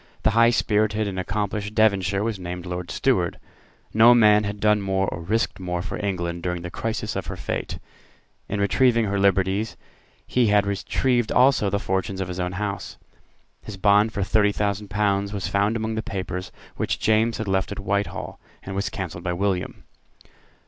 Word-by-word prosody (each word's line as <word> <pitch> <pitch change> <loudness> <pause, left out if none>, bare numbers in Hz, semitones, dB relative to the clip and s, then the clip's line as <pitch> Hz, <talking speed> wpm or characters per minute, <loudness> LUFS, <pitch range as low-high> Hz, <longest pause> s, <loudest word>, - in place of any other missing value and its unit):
The - - +4
high 115 +2 +5
spirited 110 -2 +1
and 95 -2 -3
accomplished 105 +2 -3
Devonshire 100 -3 +2
was 110 -3 -2
named 90 0 -6
Lord 90 0 -5
Steward. - - +1 0.6
No 115 +3 +7
man 105 -2 +5
had 105 0 -4
done 105 0 +3
more 95 0 0
or 80 - -6
risked 110 +7 -1
more 90 -1 -3
for 100 - -5
England 85 -3 -2
during 90 -1 -3
the 85 - -6
crisis 115 +2 -3
of - - -4
her - - -4
fate. - - -4 0.7
In 100 - -2
retrieving 115 +3 +3
her 100 -1 -1
liberties 100 +2 +1 0.5
he 125 -2 +2
had 105 -1 +4
retrieved 120 +4 0
also 125 -5 +4
the 100 - 0
fortunes 95 -1 -2
of 95 -1 -3
his 90 0 -5
own 90 0 -2
house. 100 +1 -4 0.6
His 105 - -9
bond 105 +3 +4
for 100 -2 -2
thirty 105 +2 +3
thousand 105 0 -2
pounds 100 0 0
was 100 -3 -3
found 100 +3 +1
among 110 0 -2
the 110 - -2
papers 95 -3 -5 0.3
which - - -1
James 110 +1 +2
had 110 - -4
left 95 0 0
at 100 - -5
Whitehall, 100 0 -3 0.2
and 95 - -6
was 100 +1 -1
cancelled 90 -4 -6
by 90 -1 -1
William. 95 0 -2
100 Hz, 180 wpm, -24 LUFS, 95-110 Hz, 0.7 s, No